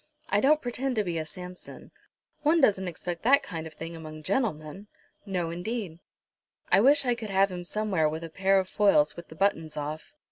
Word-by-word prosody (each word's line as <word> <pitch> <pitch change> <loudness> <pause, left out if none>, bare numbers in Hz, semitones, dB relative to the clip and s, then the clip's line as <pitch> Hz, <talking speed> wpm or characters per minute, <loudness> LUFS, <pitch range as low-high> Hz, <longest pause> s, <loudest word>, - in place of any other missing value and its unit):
I 205 - +2
don't 305 +3 +4
pretend 250 +2 -2
to 215 - +2
be 170 -3 -2
a 155 - -3
Samson. 180 +2 -10 0.5
One 310 +3 +4
doesn't 190 -8 +3
expect 175 0 -5
that 275 +4 +4
kind 165 -7 -6
of 155 - -13
thing 165 +2 -7
among 155 -1 -9
gentlemen?" 185 - -2 0.4
"No, 180 -4 -2
indeed." 180 -1 -4 0.7
"I - - +6
wish 280 +3 +5
I 245 - +3
could 230 -3 -6
have 195 0 +3
him 180 -1 -5
somewhere 190 -6 0
with 160 +2 -5
a 165 - -6
pair 195 +3 +3
of 190 - -2
foils 195 -8 +3
with 170 - -10
the 160 - -12
buttons 165 -4 0
off. 155 - -5
185 Hz, 200 wpm, -28 LUFS, 160-220 Hz, 0.7 s, I